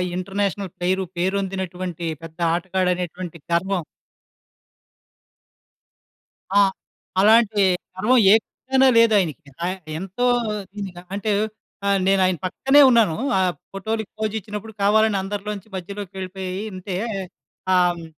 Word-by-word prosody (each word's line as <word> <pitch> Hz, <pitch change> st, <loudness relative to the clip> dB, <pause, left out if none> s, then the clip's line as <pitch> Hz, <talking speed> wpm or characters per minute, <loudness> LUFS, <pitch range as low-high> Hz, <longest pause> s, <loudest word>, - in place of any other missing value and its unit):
International 195 Hz, 0 st, -2 dB
player. 185 Hz, +2 st, 0 dB
పేరొందినటువంటి 185 Hz, -2 st, -2 dB, 0.2 s
పెద్ద 165 Hz, +1 st, -11 dB
ఆటగాడనేటువంటి 180 Hz, -1 st, -2 dB
గర్వం 185 Hz, +2 st, +1 dB, 2.8 s
ఆ! -, -, +8 dB, 0.6 s
అలాంటి 215 Hz, 0 st, +5 dB, 0.3 s
గర్వం 240 Hz, +7 st, +3 dB
ఏ -, -, +9 dB
కోశానా 265 Hz, 0 st, +1 dB
లేదాయనకి. 190 Hz, -10 st, +3 dB, 0.2 s
ఆయన 185 Hz, +2 st, -2 dB, 0.2 s
ఎంతో 195 Hz, +7 st, -2 dB, 0.5 s
నిజంగా 190 Hz, -4 st, -6 dB
అంటే, 205 Hz, +2 st, -2 dB, 0.6 s
ఆహ్, 200 Hz, 0 st, +3 dB
నేనాయన 185 Hz, -2 st, +3 dB
పక్కనే 270 Hz, +10 st, +4 dB
ఉన్నాను. 220 Hz, -9 st, +4 dB, 0.2 s
ఆ -, -, +3 dB, 0.3 s
ఫోటోలుకి 220 Hz, +2 st, -3 dB
పోజిచ్చినప్పుడు, 215 Hz, 0 st, -4 dB
కావాలని 215 Hz, 0 st, +4 dB
అందరిలోంచి 205 Hz, +1 st, -5 dB
మధ్యలోకెళ్ళిపోయి 190 Hz, -1 st, -6 dB, 0.2 s
ఇంతే 185 Hz, 0 st, -5 dB, 0.8 s
ఆ! -, -, +5 dB, 0.2 s
హ్మ్, 165 Hz, -, -9 dB
195 Hz, 95 wpm, -22 LUFS, 180-210 Hz, 2.8 s, ఏ